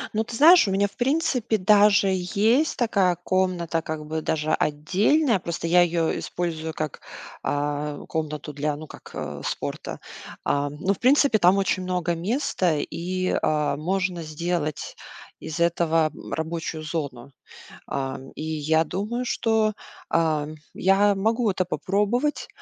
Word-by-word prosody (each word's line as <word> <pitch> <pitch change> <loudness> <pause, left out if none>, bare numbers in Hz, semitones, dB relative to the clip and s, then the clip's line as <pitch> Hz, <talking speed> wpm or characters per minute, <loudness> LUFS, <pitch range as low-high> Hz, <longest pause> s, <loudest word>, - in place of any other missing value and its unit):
Ну, 220 - +2
ты 230 - -7
знаешь, 330 - +7
у - - 0
меня, 200 +1 +2
в - - -18
принципе, 260 -4 +1
даже 205 0 +5
есть 215 - +1
такая 195 -7 +2
комната, 180 -3 0
как 155 -1 -5
бы 160 +1 -3
даже 155 0 -1
отдельная. 195 - +2
Просто 170 -1 -4
я 175 +1 +5
её 170 -1 +1
использую 160 -2 -3
как, 155 -2 -4 0.4
а, 145 0 -2
комнату 155 -1 -4
для, 145 +1 -1
ну, 155 +2 -8
как, - - -13
а, 75 -1 -5
спорта. - - -4 0.4
Ам, 145 0 -1
ну, 190 +4 +1
в - - -12
принципе, 270 -3 +4
там 185 +1 +5
очень 190 -1 +1
много 180 -2 -1
места 185 - 0
и, 185 +4 -2
а, 150 -2 +1
можно 180 +3 -1
сделать 155 -1 -3 0.4
из 160 +1 -6
этого, 165 -2 +2
м, - - -11
рабочую 160 0 -3
зону. 140 -5 -5 0.6
Ам, 135 -1 -4
и - - -7
я 160 0 +1
думаю, 210 +9 -3
что, 220 -3 +1 0.3
ам, 155 -2 0 0.2
я 200 +2 +3
могу 220 +2 +1
это 185 -1 0
попробовать. 220 +10 -1
175 Hz, 145 wpm, -24 LUFS, 155-205 Hz, 0.6 s, знаешь